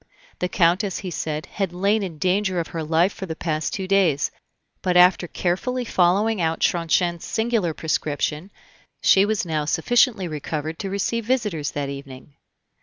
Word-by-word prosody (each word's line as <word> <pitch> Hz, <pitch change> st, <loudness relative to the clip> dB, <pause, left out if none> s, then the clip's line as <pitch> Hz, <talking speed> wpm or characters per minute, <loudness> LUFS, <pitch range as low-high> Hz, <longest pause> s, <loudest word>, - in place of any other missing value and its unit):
The 180 Hz, -, -1 dB
Countess, 185 Hz, +3 st, +2 dB
he 185 Hz, -2 st, -5 dB
said, 155 Hz, -1 st, -3 dB
had 195 Hz, -2 st, -3 dB
lain 200 Hz, +4 st, +1 dB
in 180 Hz, -5 st, -5 dB
danger 185 Hz, +2 st, +1 dB
of 165 Hz, -, -3 dB
her 165 Hz, -, -4 dB
life 165 Hz, +5 st, +2 dB
for 190 Hz, -, -7 dB
the 160 Hz, -, -4 dB
past 155 Hz, -2 st, -2 dB
two 190 Hz, -5 st, -4 dB
days; 180 Hz, -7 st, +2 dB, 0.5 s
but 180 Hz, -1 st, +1 dB
after 180 Hz, 0 st, +5 dB
carefully 245 Hz, +10 st, -2 dB
following 195 Hz, +2 st, +2 dB
out 165 Hz, 0 st, 0 dB
Tronchin's 170 Hz, 0 st, +1 dB
singular 220 Hz, -8 st, 0 dB
prescription, 155 Hz, +2 st, -2 dB, 0.5 s
she 195 Hz, +1 st, +6 dB
was 215 Hz, -2 st, -1 dB
now 155 Hz, -3 st, -1 dB
sufficiently 220 Hz, -, +2 dB
recovered 155 Hz, +1 st, -4 dB
to 195 Hz, -, -3 dB
receive 210 Hz, +4 st, -1 dB
visitors 210 Hz, -, 0 dB
that 140 Hz, -1 st, -2 dB
evening. 140 Hz, 0 st, -9 dB
180 Hz, 160 wpm, -23 LUFS, 160-200 Hz, 0.5 s, she